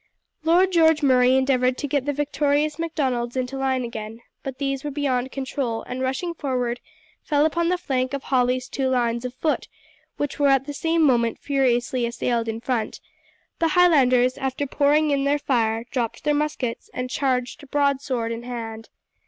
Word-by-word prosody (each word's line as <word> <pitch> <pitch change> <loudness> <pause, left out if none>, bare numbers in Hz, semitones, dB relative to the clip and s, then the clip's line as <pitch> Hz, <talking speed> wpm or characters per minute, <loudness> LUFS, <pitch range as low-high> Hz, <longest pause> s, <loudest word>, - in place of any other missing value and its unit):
Lord 355 +4 +4
George 320 -3 +4
Murray 255 -1 +5
endeavoured 260 -1 +2
to 290 - -3
get 280 -1 0
the - - +2
victorious 295 +1 0
Macdonalds 260 -7 -1
into 255 +1 -2
line 265 -1 0
again; 225 -1 -7 0.2
but 265 -1 -6
these 275 -1 -2
were 295 - -3
beyond 265 -3 -1
control 260 -3 -3
and 250 +1 -5
rushing 265 +7 -2
forward 250 -6 -2 0.4
fell 295 0 +2
upon 335 +2 +1
the 360 - +1
flank 260 -4 -1
of 275 - -6
Hawley's 250 -1 +1
two 265 0 -1
lines 240 -1 0
of 250 0 -5
foot, 310 +3 -1 0.5
which 290 0 -3
were 285 - +4
at 270 -1 +3
the 290 - -5
same 325 +2 +1
moment 235 -5 +3
furiously 250 -3 +1
assailed 235 0 -1
in 225 0 -3
front; 235 -3 -2 0.6
the 330 - +3
Highlanders, 255 -8 +4
after 265 +1 -2
pouring 295 +2 +2
in 280 -1 +1
their 285 +1 +2
fire, 230 -5 0
dropped 240 -4 -2
their 295 - +2
muskets 290 -5 -2
and 250 0 -2
charged 255 0 -2
broadsword 270 -5 0
in 230 0 -4
hand. 225 -2 -6
265 Hz, 170 wpm, -23 LUFS, 245-290 Hz, 0.6 s, Murray